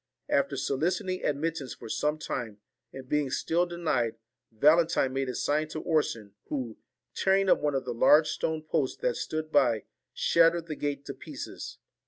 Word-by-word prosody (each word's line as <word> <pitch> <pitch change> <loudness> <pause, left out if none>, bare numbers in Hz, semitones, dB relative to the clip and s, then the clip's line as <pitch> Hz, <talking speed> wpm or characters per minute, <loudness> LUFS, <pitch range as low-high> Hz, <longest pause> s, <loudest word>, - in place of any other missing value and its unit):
After 140 0 +1
soliciting 175 +7 -1
admit 155 +3 0
tance 135 -5 -6
for - - -10
some 150 +7 0
time, 120 -8 -4 0.3
and 130 -1 -9
being 150 0 +1
still 170 +6 +1
denied, 150 -10 -1 0.4
Valen 155 +9 +4
tine 130 -5 +1
made 135 -1 -1
a 125 - -4
sign 150 +5 0
to 155 - -5
Orson, 115 - -1
who, 125 -6 -4 0.4
tearing 195 0 +3
up - - +5
one 145 -1 0
of 135 -1 -1
the 125 - -3
large 150 +6 +5
stone 160 0 -2
posts 155 -3 -1
that - - +1
stood 155 0 -4
by, 120 -7 +3 0.3
shattered 165 0 +3
the 155 -2 -5
gate 145 -1 -3
to - - -5
pieces. - - -8
150 Hz, 175 wpm, -28 LUFS, 130-165 Hz, 0.4 s, up